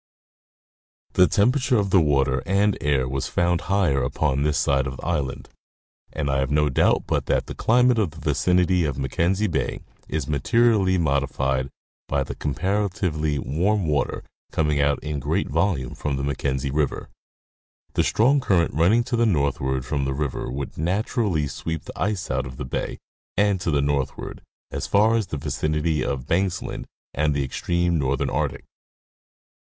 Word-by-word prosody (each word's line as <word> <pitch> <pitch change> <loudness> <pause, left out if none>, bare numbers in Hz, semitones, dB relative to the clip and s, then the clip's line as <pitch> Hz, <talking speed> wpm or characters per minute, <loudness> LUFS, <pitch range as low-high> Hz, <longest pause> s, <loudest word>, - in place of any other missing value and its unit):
The 90 - +5
temperature 125 +4 +2
of 100 -2 0
the 95 - +6
water 70 -4 +2
and 100 +1 +2
air 70 -4 +1
was 65 +1 -2
found 85 -1 +1
higher 90 -9 +2
upon 70 +2 0
this 75 0 +1
side 70 -1 +2
of 65 0 -6
the - - -9
island, 65 -2 -2 0.6
and 75 -1 -3
I 70 -1 +1
have 70 -1 0
no 75 0 +2
doubt 65 - +2
but - - -1
that - - +1
the - - -7
climate 125 0 +3
of 100 -6 +1
the 80 +1 -13
vicinity 90 +5 +2
of 70 -5 -2
Mackenzie 85 +9 0
bay 85 -7 -2 0.3
is 80 -3 -2
materially 95 - +3
modified 70 -4 0 0.4
by 70 -1 0
the - - -6
comparatively 90 -2 -1
warm 90 +8 0
water 75 -3 -1 0.3
coming 75 -2 +1
out 70 0 +2
in 75 -1 -3
great 65 - -1
volume 80 -6 0
from 75 -2 -3
the 70 - -3
Mackenzie 70 -1 -1
river. 75 0 -1 0.8
The - - +2
strong 135 +6 +3
current 90 - +1
running 95 +10 +3
to 120 - -2
the 115 0 +3
northward 65 -6 0
from 70 0 -1
the 65 0 -2
river 70 -2 -3
would 70 +3 -5
naturally 95 - 0
sweep 80 +3 -4
the - - -9
ice 100 -1 -1
out 65 - -1
of 65 0 -10
the - - -5
bay 65 - -3 0.4
and 100 -2 +2
to 90 - -1
the 70 -2 +2
northward, 70 -2 -2 0.3
as - - -3
far 105 +3 +4
as 110 -4 0
the 75 - -4
vicinity 75 +2 -1
of 65 -2 -3
Banksland 90 +3 -1 0.3
and 75 -1 +1
the 70 - +1
extreme 85 +4 0
northern 70 -1 0
Arctic. - - -2
75 Hz, 170 wpm, -24 LUFS, 70-95 Hz, 0.8 s, the